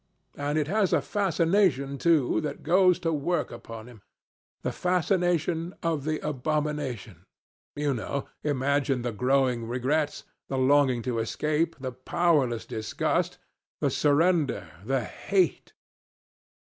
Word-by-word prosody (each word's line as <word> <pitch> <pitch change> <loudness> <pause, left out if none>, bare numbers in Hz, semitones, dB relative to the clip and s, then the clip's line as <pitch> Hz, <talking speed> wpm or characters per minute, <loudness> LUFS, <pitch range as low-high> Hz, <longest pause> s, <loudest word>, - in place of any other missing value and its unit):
And 145 +1 -1
it 150 -2 +1
has 200 +1 +1
a - - +5
fascination, 165 -7 +1
too, 160 -7 +3
that 150 -2 -5
goes 180 +2 +4
to 165 -2 0
work 165 +4 -1
upon 115 -2 -9
him. 120 -4 -14 0.6
The - - -1
fascination 175 -1 0
of 160 -4 -1
the 155 0 0
abomination 140 - -3 0.5
you 145 -1 0
know. 130 +4 -3 0.2
Imagine 140 -2 +1
the 120 - -1
growing 125 0 +1
regrets, 140 +5 -1 0.2
the 135 - -2
longing 130 -2 +3
to 125 -3 -1
escape, 155 +8 0
the 130 -1 -4
powerless 130 -3 +1
disgust, 110 -1 -1 0.4
the - - +1
surrender, 155 +1 +2
the 130 +2 0
hate." 185 - -1
145 Hz, 120 wpm, -27 LUFS, 125-165 Hz, 0.6 s, a